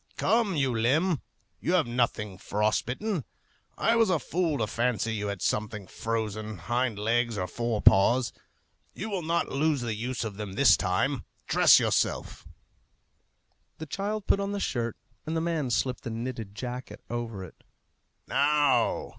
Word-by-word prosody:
"Come, 225 Hz, -5 st, +2 dB
you 135 Hz, -5 st, +1 dB
limb; 145 Hz, +9 st, +2 dB, 0.4 s
you 175 Hz, -, -1 dB
have 180 Hz, -5 st, +4 dB
nothing 115 Hz, -5 st, -1 dB
frost 105 Hz, +2 st, 0 dB
bitten! 180 Hz, -, -2 dB, 0.5 s
I 230 Hz, -, +3 dB
was 225 Hz, -2 st, +4 dB
a 180 Hz, -, +3 dB
fool 160 Hz, +1 st, -1 dB
to 110 Hz, -, 0 dB
fancy 115 Hz, 0 st, 0 dB
you 105 Hz, -1 st, -2 dB
had 100 Hz, -2 st, -4 dB
something 105 Hz, -1 st, -1 dB
frozen, 110 Hz, 0 st, -3 dB
hind 120 Hz, +5 st, -1 dB
legs 115 Hz, +1 st, +1 dB
or 90 Hz, -, -1 dB
fore 115 Hz, +3 st, -2 dB
paws. 120 Hz, +6 st, +5 dB, 0.6 s
You 215 Hz, +3 st, -5 dB
will 190 Hz, -3 st, -1 dB
not 170 Hz, +1 st, 0 dB
lose 145 Hz, 0 st, +1 dB
the 115 Hz, -2 st, -2 dB
use 120 Hz, +4 st, -3 dB
of 105 Hz, -3 st, -5 dB
them 105 Hz, -3 st, -5 dB
this 140 Hz, +7 st, +6 dB
time. 100 Hz, +9 st, 0 dB, 0.2 s
Dress -, -, +6 dB
yourself!" -, -, -1 dB, 1.3 s
The 160 Hz, -, -6 dB
child 200 Hz, +6 st, -3 dB
put -, -, +3 dB
on 200 Hz, 0 st, -2 dB
the 200 Hz, -, -2 dB
shirt, 120 Hz, -, -2 dB, 0.3 s
and 160 Hz, +1 st, -1 dB
the -, -, +2 dB
man 160 Hz, -5 st, -1 dB
slipped 125 Hz, +1 st, 0 dB
the -, -, -4 dB
knitted 115 Hz, -3 st, -5 dB
jacket 125 Hz, +3 st, -6 dB
over 115 Hz, -5 st, -4 dB
it. 90 Hz, -, -13 dB, 0.6 s
"Now...." 145 Hz, +1 st, +2 dB
120 Hz, 160 wpm, -28 LUFS, 110-155 Hz, 1.3 s, this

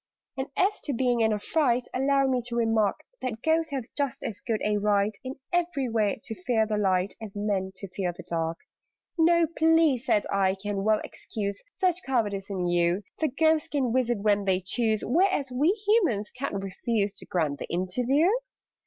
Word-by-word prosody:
"And 265 Hz, 0 st, -3 dB
as 395 Hz, +3 st, +2 dB
to 285 Hz, -, -1 dB
being 245 Hz, -1 st, +1 dB
in 220 Hz, 0 st, +3 dB
a 210 Hz, -, +1 dB
fright, 250 Hz, +1 st, +1 dB
Allow 275 Hz, +1 st, +2 dB
me 255 Hz, -2 st, +1 dB
to 235 Hz, -, -4 dB
remark 225 Hz, -3 st, +1 dB, 0.2 s
That 230 Hz, -3 st, -4 dB
Ghosts 320 Hz, 0 st, +2 dB
have 270 Hz, -5 st, -3 dB
just 280 Hz, -3 st, -2 dB
as 205 Hz, -3 st, -4 dB
good 220 Hz, 0 st, -2 dB
a 210 Hz, 0 st, +2 dB
right, 205 Hz, 0 st, +1 dB
In 260 Hz, +1 st, -5 dB, 0.2 s
every 335 Hz, -7 st, 0 dB
way, 215 Hz, -3 st, +1 dB
to -, -, -5 dB
fear 220 Hz, +3 st, +1 dB
the 215 Hz, -1 st, -1 dB
light, 190 Hz, -1 st, +1 dB
As 210 Hz, -2 st, -8 dB
Men 200 Hz, -2 st, -1 dB
to 195 Hz, -, -7 dB
fear 180 Hz, -1 st, -2 dB
the 175 Hz, -, -11 dB
dark." 165 Hz, 0 st, -2 dB, 0.6 s
"No 340 Hz, +1 st, +5 dB
plea," 320 Hz, -3 st, +3 dB
said 210 Hz, -3 st, +1 dB
I, 190 Hz, -1 st, +2 dB
"can 195 Hz, 0 st, -3 dB
well 215 Hz, 0 st, +3 dB
excuse 200 Hz, -2 st, -5 dB
Such 365 Hz, -6 st, 0 dB
cowardice 210 Hz, -7 st, -1 dB
in 185 Hz, -3 st, -2 dB
you: 175 Hz, +2 st, +2 dB, 0.2 s
For 315 Hz, -, +2 dB
Ghosts 315 Hz, +3 st, +2 dB
can 260 Hz, -5 st, 0 dB
visit 245 Hz, -2 st, +1 dB
when 205 Hz, 0 st, +1 dB
they 190 Hz, -1 st, +2 dB
choose, 215 Hz, +3 st, 0 dB
Whereas 320 Hz, -, +2 dB
we 275 Hz, +6 st, +2 dB, 0.2 s
Humans 350 Hz, -, +2 dB
ca'n't 205 Hz, -6 st, -3 dB
refuse 200 Hz, +1 st, -1 dB
To -, -, -10 dB
grant 155 Hz, -5 st, -1 dB
the -, -, -6 dB
interview." 245 Hz, -, +1 dB
225 Hz, 190 wpm, -27 LUFS, 200-275 Hz, 0.6 s, No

